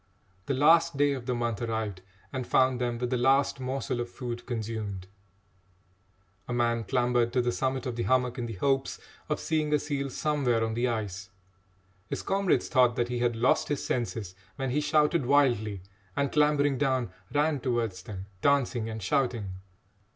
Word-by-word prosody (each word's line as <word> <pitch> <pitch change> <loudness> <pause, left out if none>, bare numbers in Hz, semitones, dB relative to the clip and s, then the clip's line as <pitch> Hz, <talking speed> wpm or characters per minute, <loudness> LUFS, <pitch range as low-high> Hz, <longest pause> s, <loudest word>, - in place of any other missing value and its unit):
The 135 - 0
last 165 +2 +4
day 145 0 +3
of 130 -2 -6
the 125 - 0
month 120 -2 -2
arrived 110 -5 -3 0.3
and 130 -2 -3
found 130 -1 +3
them 120 -1 -1
with 125 +1 -3
the 125 - +1
last 135 +2 +3
morsel 130 -1 -2
of 120 0 -3
food 120 -1 -6
consumed. 110 -5 -4 1.4
A - - -5
man 120 -1 +1
clambered 120 -1 +1
to 130 - +2
the 120 - +1
summit 130 +1 -1
of 125 -2 -3
the 120 - -2
hummock 125 +3 +1
in 120 - -2
the 115 - -5
hopes 135 +6 0 0.3
of - - 0
seeing 155 -2 0
a 150 - +5
seal 140 -2 -3
somewhere 130 -5 +1
on 110 - -3
the 120 +2 +1
ice. 105 -4 -3 0.8
His - - -4
comrades 195 -1 +1
thought 125 -4 +4
that 120 0 0
he 125 0 -2
had 120 -1 +1
lost 120 +3 +2
his 145 -2 -2
senses 115 -6 -2 0.2
when 135 -2 -2
he 150 +4 +1
shouted 150 -1 +2
wildly 120 -9 +2 0.3
and, 140 -1 0
clambering 145 -2 +3
down, 130 -4 +1 0.2
ran 145 +1 +1
towards 115 -7 -1
them, 95 0 -7 0.2
dancing 130 -5 +2
and 110 -2 -6
shouting. 120 -4 0
125 Hz, 175 wpm, -28 LUFS, 115-140 Hz, 1.4 s, a